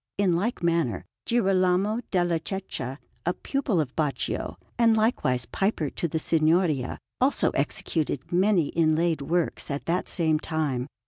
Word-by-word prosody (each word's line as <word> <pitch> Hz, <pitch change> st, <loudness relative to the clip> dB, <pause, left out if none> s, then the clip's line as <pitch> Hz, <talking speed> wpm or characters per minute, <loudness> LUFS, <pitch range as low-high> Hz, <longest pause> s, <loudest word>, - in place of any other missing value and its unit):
In 195 Hz, -4 st, +3 dB
like 205 Hz, +3 st, -1 dB
manner, 165 Hz, -, +1 dB, 0.2 s
Girolamo 195 Hz, -1 st, +2 dB
della 175 Hz, -3 st, +1 dB
Cecca, 160 Hz, -9 st, -5 dB, 0.3 s
a 175 Hz, -, +1 dB
pupil 270 Hz, -10 st, -1 dB
of 140 Hz, -5 st, -2 dB
Baccio 150 Hz, -3 st, -1 dB, 0.2 s
and 230 Hz, -1 st, +5 dB
likewise 130 Hz, -, +1 dB
piper 195 Hz, -, -1 dB
to 170 Hz, -, -2 dB
the 160 Hz, -, -2 dB
Signoria, 155 Hz, -4 st, +2 dB, 0.2 s
also 265 Hz, +3 st, +3 dB
executed 150 Hz, -4 st, -1 dB
many 180 Hz, -3 st, +3 dB
inlaid 160 Hz, -1 st, +2 dB
works 170 Hz, +4 st, -1 dB
at 140 Hz, 0 st, -3 dB
that 175 Hz, +2 st, -1 dB
same 160 Hz, -4 st, +1 dB
time. 145 Hz, -6 st, -2 dB
170 Hz, 135 wpm, -26 LUFS, 155-195 Hz, 0.3 s, and